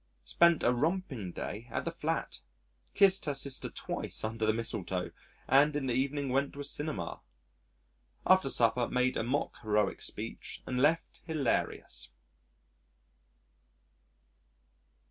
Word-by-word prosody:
Spent 170 - +4
a 120 - +4
romping 135 - -1
day 110 +6 -6
at - - -3
the - - -1
Flat. - - -3 0.6
Kissed 195 -1 +6
her 145 -2 -1
sister 135 -1 0
twice - - -3
under 110 0 -1
the - - +5
mistletoe, 110 -5 -2 0.4
and 145 +2 +5
in 145 -2 -1
the 125 - 0
evening 140 +2 -1
went 135 +2 0
to 140 - -10
a - - -3
cinema. 145 +2 -2 1.0
After 185 -6 +5
supper 120 0 +3
made 125 0 +1
a - - 0
mock 130 +6 -2
heroic 105 -3 0
speech - - -5
and 125 0 -1
left 160 +4 +1
hilarious. 155 -6 -1
130 Hz, 125 wpm, -31 LUFS, 115-150 Hz, 1.0 s, Kissed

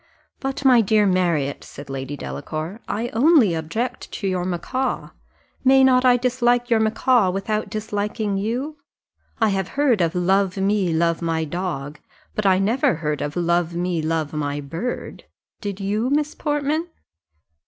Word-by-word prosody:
"But, 270 0 -4
my 250 -3 +7
dear 210 0 +3
Marriott," 170 -7 +1
said 145 - -11
Lady 135 +1 -5
Delacour, 155 - -5
"I 230 +3 -2
only 250 - +4
object 220 +11 -3
to 200 - -3
your 180 -1 -1
macaw 255 +9 -2 0.5
may 265 0 +6
not 255 -1 +4
I 250 -1 +6
dislike 245 0 +1
your 225 - +5
macaw 220 -1 +3
without 200 +3 -2
disliking 210 0 -2
you? 245 +10 -2 0.6
I 220 -2 +3
have 195 -1 -1
heard 260 -9 +3
of 170 +1 +1
'love 190 +2 +2
me, 195 -2 +1
love 165 +1 +1
my 165 -1 0
dog;' 155 -3 -4 0.3
but 210 -2 0
I 190 -1 +5
never 210 +2 +2
heard 150 -2 -2
of 145 0 -3
'love 170 -1 +1
me, 175 -1 -1
love 155 -1 -1
my 145 -1 -2
bird' 165 - -5 0.3
did 200 -2 -5
you, 210 +5 -1
Miss 295 +1 0
Portman?" 295 +2 -1
195 Hz, 155 wpm, -22 LUFS, 170-240 Hz, 0.6 s, my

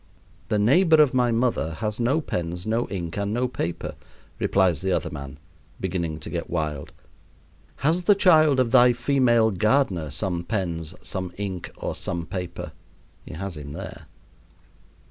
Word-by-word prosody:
"The 105 - +1
neighbor 160 - +5
of 150 -4 +5
my 125 -2 +3
mother 115 -9 0
has 105 +3 -3
no 130 +7 +2
pens, 90 - -4
no 115 +2 0
ink, 85 -3 -4
and 100 0 -1
no 125 +1 +1
paper," 85 -8 -4 0.5
replies 95 -6 +2
the 95 0 -1
other - - -1
man, 70 -1 -7 0.4
beginning 85 -4 -2
to - - -7
get 85 -1 -4
wild. 75 -4 -3 0.9
"Has 170 +4 +2
the 205 - +6
child 155 -8 +5
of 120 -3 +2
thy 125 -1 +6
female 120 -3 +3
gardener 105 - +1
some 90 0 -2
pens, 85 -5 -3
some 95 -2 -4
ink, 95 -4 -4
or - - -3
some 85 -2 -3
paper?" 90 0 -5 0.6
He - - -7
has 95 +1 -5
him 70 -1 -8
there. - - -8
100 Hz, 155 wpm, -24 LUFS, 85-125 Hz, 0.9 s, the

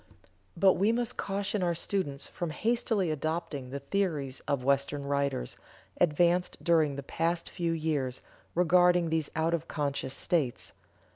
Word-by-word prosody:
But 195 -1 +6
we 205 +4 +3
must 240 +1 -1
caution 200 +1 -1
our 175 -1 +1
students 160 -6 -2
from 175 - -4
hastily 215 0 0
adopting 155 -3 -3
the 140 - -4
several 140 0 -13
theories 155 -10 0
of 140 -3 0
Western 140 +1 +1
writers, 140 - -1 0.4
advanced 175 +2 +2
during 160 -5 +3
the 140 - -5
past 165 +4 -1
few 170 -1 -1
years, 150 -6 -1 0.3
regarding 175 -1 +4
these 160 -2 0
out 160 +1 +1
of 170 - -1
conscious 140 -2 -2
states. 145 -9 -1
160 Hz, 145 wpm, -30 LUFS, 140-180 Hz, 0.4 s, But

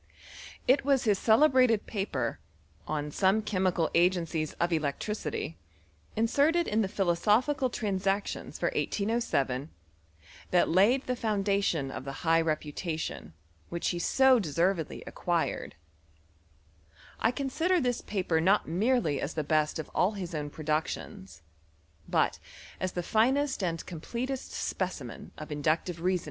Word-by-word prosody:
It 265 +2 +4
was 275 -1 +2
his 205 -4 +2
celebrated 255 -2 +4
paper 145 - -2 0.2
" 75 +1 -32
On 150 0 -4
some 195 +6 +2 0.5
Agencies 170 -3 +1
of 170 0 0
Electricity," 160 +7 -3 0.6
inserted 285 +10 +2
in 215 +2 +1
the 200 - +1
phical 210 +9 +1
Transactions 200 -2 -2
for - - 0
1807, 160 - -1 0.8
that 180 - +3
laid 215 +10 +4
the 210 -5 0
tion 150 -8 0
of - - -6
the 135 - -4
high 165 0 +4
reputation 155 - -3 0.4
which 170 0 -1
he 175 - -2
so 265 +7 +4
d 170 -1 -1
acquired. - - -2 1.4
I - - +3
consider 300 +8 0
this 245 -4 0
paper 180 -5 0
not 195 +5 +3
mere 220 +10 +2
best 155 - 0
of 160 - -5
all 190 +4 +2
his 185 -4 -6
own 150 -2 -3
productions, 155 - -4 0.7
but - - +1 0.4
as 185 -1 -2
the 175 -1 -3
i 235 - +2
completest 240 - -4
specimen 170 -10 -4
of 155 0 -8
inductive 160 +3 -1
reason! 180 +1 +2
190 Hz, 120 wpm, -29 LUFS, 160-230 Hz, 1.4 s, It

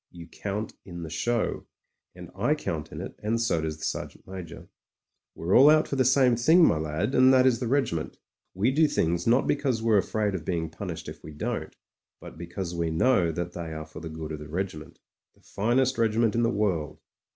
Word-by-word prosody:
You 85 -1 -11
count 105 +4 -5
in 85 -2 -8
the 80 - -7
show, 115 +8 -1 0.5
and - - -11
I - - +1
count - - -4
in - - -6
it, - - -7
and 110 +2 0
so 115 -8 +1
does 80 -1 -3
the - - -12
Sergeant - - -5
Major. 90 -3 -9 0.7
We're 85 +4 0
all 140 +4 +8
out 155 0 +4
for - - -3
the 130 - +3
same 130 -1 +4
thing, 160 +9 +5
my 80 - +3
lad, 80 - -2
and 130 0 +6
that 130 -1 +5
is 125 -3 +3
the 125 - -2
regiment. 115 - -1 0.4
We 105 +7 +2
do 155 +3 +4
things 85 - 0
not 120 +3 +4
because 130 -6 0
we're 110 -3 +4
afraid 105 +1 -1
of 90 -4 -4
being 80 -2 -2
pimished - - -6
if - - -9
we 75 - -9
don't, 75 - -4 0.4
but - - -11
because 85 +2 -6
we 85 -1 -1
know 85 +1 +2
that 85 +2 -4
they 85 -2 -6
are 80 0 -6
for 80 - -11
the 80 0 -7
good 80 0 -7
of 75 - -5
the 75 -1 -10
regiment 85 -2 -5 0.2
— - - -39
^the - - -28
finest 125 +4 +1
regiment 115 -1 +2
in 115 - +1
the 115 - +2
world. 85 -9 -1
100 Hz, 220 wpm, -27 LUFS, 80-120 Hz, 0.7 s, all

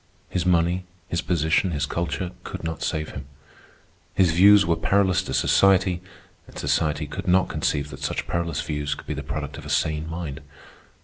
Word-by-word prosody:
His 90 -1 -1
money, 90 +1 +2 0.2
his 85 - 0
position, 85 +2 +1
his 75 -4 -1
culture, 85 +1 -3
could - - -7
not 80 0 -4
save 75 0 -2
him. - - -7 0.9
His 95 -3 +4
views 100 +4 +7
were 85 0 +2
perilous 95 0 +2
to 95 - -6
society, 95 -2 +3 0.5
and - - -13
society 75 0 0
could 75 +4 -6
not 90 +1 +3
conceive 70 0 -1
that 65 - -9
such - - -2
perilous 85 -4 -2
views 75 -2 -2
could - - -12
be - - -3
the 75 - -4
product 75 +1 -5
of - - -11
a - - -7
sane 80 0 0
mind. 80 -3 -5
85 Hz, 180 wpm, -24 LUFS, 75-90 Hz, 0.9 s, views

